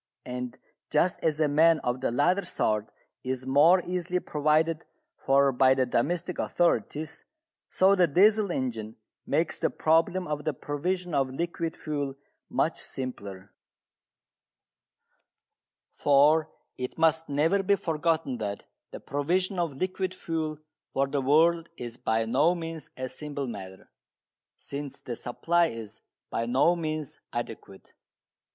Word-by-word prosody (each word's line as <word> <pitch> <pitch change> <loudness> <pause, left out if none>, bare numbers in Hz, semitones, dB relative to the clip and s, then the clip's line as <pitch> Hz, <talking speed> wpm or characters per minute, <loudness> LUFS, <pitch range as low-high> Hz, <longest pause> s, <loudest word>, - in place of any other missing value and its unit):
And 125 0 -5 0.3
just 170 +4 +2
as 155 -2 0
a 155 - +3
man 160 +3 +5
of 125 +1 -2
the - - +1
latter 160 +11 +2
sort 110 - -1 0.3
is 130 0 -3
more 155 +7 +5
easily 180 0 -1
provided 155 +1 +1 0.3
for 140 0 +3
by 130 +1 +4
the 130 -1 +2
domestic 175 +9 -1
authorities, 160 - 0 0.5
so 190 +1 +4
the 180 -3 +4
Diesel 205 +5 +4
engine 115 -6 -3 0.3
makes 165 0 0
the - - +1
problem 165 +3 +2
of 150 -1 -3
the 155 -2 -1
provision 175 +6 -3
of 135 -2 +2
liquid 165 +3 -3
fuel 145 -3 -3 0.3
much - - 0
simpler. 100 -7 -6 2.4
For 150 +3 +4 0.3
it 125 0 -4
must 160 0 +2
never 160 +8 +2
be 200 +1 +3
forgotten 160 -7 -1
that 100 -2 -4 0.3
the - - -8
provision 180 +7 -1
of 165 -6 -2
liquid 185 +2 -2
fuel 160 -3 -3 0.4
for 135 - +2
the 140 0 -1
world 165 +5 +3
is 120 -1 -6
by 110 -2 0
no 145 +10 +3
means 165 -3 -6
a 130 0 -3
simple 145 +2 -5
matter, 95 -5 -9 0.7
since 140 -1 -7
the 120 - -6
supply 170 +9 +1
is 110 -5 -8 0.3
by 115 - -1
no 135 +8 +3
means 155 -3 -4
adequate. 115 -4 -7
150 Hz, 130 wpm, -28 LUFS, 130-170 Hz, 2.4 s, man